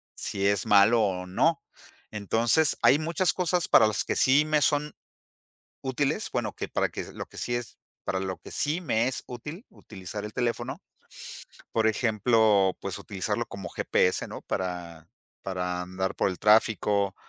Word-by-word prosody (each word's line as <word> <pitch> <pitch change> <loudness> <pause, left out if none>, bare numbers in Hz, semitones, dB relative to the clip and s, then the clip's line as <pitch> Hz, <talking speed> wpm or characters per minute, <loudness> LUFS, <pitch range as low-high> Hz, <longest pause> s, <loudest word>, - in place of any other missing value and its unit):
si 100 -1 -3
es 100 0 +1
malo 105 +3 +5
o 95 -3 -1
no. 90 +1 +1 0.5
Entonces, 115 - +2
hay 145 - +5
muchas 170 +4 +1
cosas 180 -1 0
para 110 - +7
las 105 - 0
que - - -1
sí 140 +3 +5
me 155 -1 +2
son 150 0 +1 0.9
útiles, 140 +8 -1
bueno, 120 -4 -1
que - - -5
para - - 0
que - - -5
lo - - -6
que - - -16
sí 120 - -2
es 120 -2 -5 0.3
para 95 - -1
lo 95 -2 -4
que - - -13
sí 155 +5 -1
me 120 -6 +1
es 130 - -3
útil, 145 - -8
utilizar 100 +1 -8
el 105 - -8
teléfono. 125 +4 -2 0.9
Por 110 -1 +2
ejemplo, 110 -3 +3
pues, 100 -3 -4
utilizarlo 105 +3 -3
como 95 -3 -7
GPS, 90 +1 +1
¿no? - - -8
Para 85 -3 -5 0.4
para 90 -1 -3
andar 95 +1 -3
por - - +1
el 90 - -6
tráfico 105 -2 +3
110 Hz, 165 wpm, -27 LUFS, 95-130 Hz, 0.9 s, para